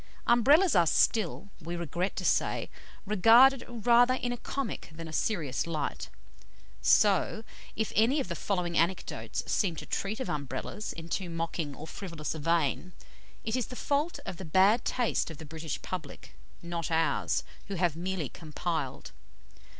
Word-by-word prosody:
Umbrellas 285 - +5
are 170 -2 +5
still, 205 +2 +2
we 170 +1 -5
regret 170 +3 -2
to - - -4
say, - - +1 0.3
regarded 230 +6 +6
rather 240 +2 +4
in 245 -1 -2
a - - -1
comic 240 - -4
than 165 +1 -8
a 160 - -9
serious 160 - -1
light; 155 -4 -3 0.7
so, 205 +2 +3 0.3
if 220 - -2
any 240 +7 +4
of 275 - -2
the 175 - -3
following 180 -2 -2
anecdotes 170 +3 -1
seem 185 -6 0
to - - -7
treat 210 +4 -2
of 260 - -3
Umbrellas 145 - -4
in 165 0 -8
too 180 +1 -3
mocking 165 -3 -3
or 155 - -8
frivolous 165 -2 -5
a 160 - -6
vein, 165 +2 0 0.5
it 220 +1 -1
is 255 -3 -1
the 250 - -8
fault 290 +6 -1
of 180 - -5
the 190 - -7
bad 190 +7 +4
taste 245 -7 0
of 160 - -9
the 160 - -9
British 160 0 -5
public, 160 -6 -7 0.3
not 170 -1 -3
ours, 165 0 +1 0.2
who 200 - -4
have 175 -3 +1
merely 180 -2 -2
compiled. 155 -2 -4
180 Hz, 160 wpm, -29 LUFS, 165-225 Hz, 0.7 s, regarded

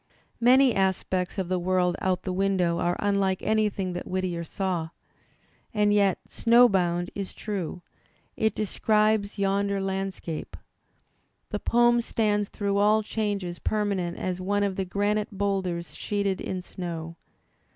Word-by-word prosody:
Many 255 +1 +5
aspects 190 -1 0
of 190 -2 -1
the 185 0 0
world 180 0 +1
out 185 -1 0
the 185 - -2
window 185 -3 +1
are 175 0 +1
unlike 200 -2 +1
anything 210 -4 0
that 175 - -5
Whittier 185 -2 -2
saw. 175 -1 -2 0.9
And 210 0 +3
yet 200 -3 +3
"Snow 240 +1 +5
Bound" 175 -3 0
is 200 -2 -5
true; 185 -4 -4 0.5
it 220 0 +1
describes 215 0 +1
yonder 200 0 +1
landscape. 195 -4 -4 0.9
The - - -2
poem 240 0 +3
stands 210 -3 0
through 200 -1 -1
all 210 +2 +4
changes 205 -5 -3
permanent 200 -5 -1
as 185 0 -3
one 205 +2 +1
of 200 -2 0
the 190 - -2
granite 205 +2 -1
boulders 190 -4 -1
sheeted 200 -2 -2
in 185 -1 -4
snow. 170 -3 -6
195 Hz, 135 wpm, -26 LUFS, 180-210 Hz, 0.9 s, Many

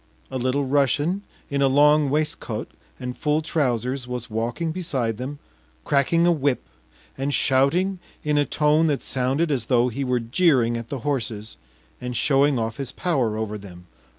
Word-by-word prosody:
A 130 - -2
Little 130 +3 0
Russian 145 +7 +1 0.3
in 140 0 0
a 135 - +5
long 145 +2 +5
waistcoat 140 -6 -2 0.3
and 125 -1 -5
full 150 +1 0
trousers 130 -4 -1
was 125 -2 -5
walking 120 +9 -2
beside 130 - -2
them, 135 +4 -5 0.5
cracking 155 +5 +3
a 175 - +5
whip 145 -5 0 0.6
and 140 +1 0
shouting 160 +9 +2 0.2
in 150 0 +1
a 145 - +4
tone 150 +2 +2
that 145 -3 0
sounded 135 +5 0
as 125 -5 -1
though 125 -1 +3
he 135 +4 -3
were 125 -1 +1
jeering 120 -1 +2
at 115 0 -5
the 135 -4 -4
horses 115 -6 -2 0.5
and 125 -1 -3
showing 140 +1 +3
off 115 -1 -2
his 135 -2 -4
power 130 -12 0
over 105 -1 -3
them. 90 -3 -12
135 Hz, 165 wpm, -24 LUFS, 120-150 Hz, 0.6 s, a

